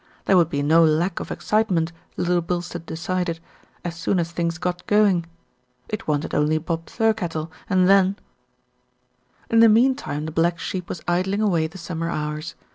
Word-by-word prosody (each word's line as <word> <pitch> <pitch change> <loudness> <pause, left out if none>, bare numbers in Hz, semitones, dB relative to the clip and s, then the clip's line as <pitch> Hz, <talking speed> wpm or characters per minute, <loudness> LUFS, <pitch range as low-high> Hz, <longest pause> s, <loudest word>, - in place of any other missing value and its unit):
There 195 - +4
would 170 -3 +4
be 145 -2 -1
no 160 +3 +5
lack 165 +3 +2
of - - -6
excite 220 +1 0
ment, 165 -2 +1 0.3
Little 175 0 +1
Bilstead 175 -1 -4
decided, 170 0 -2 0.5
as 170 -1 -3
soon 170 +3 0
as 170 0 -2
things 170 0 -2
got 180 +1 -3
going. 200 -5 +3 0.6
It 215 - -5
wanted 150 0 -1
only 150 +1 +2
Bob 165 +1 -3
Thirkettle 175 -8 -1 0.2
and 185 -2 +3
then 195 0 +4 1.3
In 230 - +5
the 230 0 +8
meantime 230 - +2
the 160 - -4
black 170 +2 +1
sheep 180 +1 -5
was 170 - -6
idling 190 +4 +1
away 170 -6 +2
the 170 +4 -12
summer 165 -1 -4
hours. 150 0 -4
175 Hz, 170 wpm, -23 LUFS, 165-190 Hz, 1.3 s, the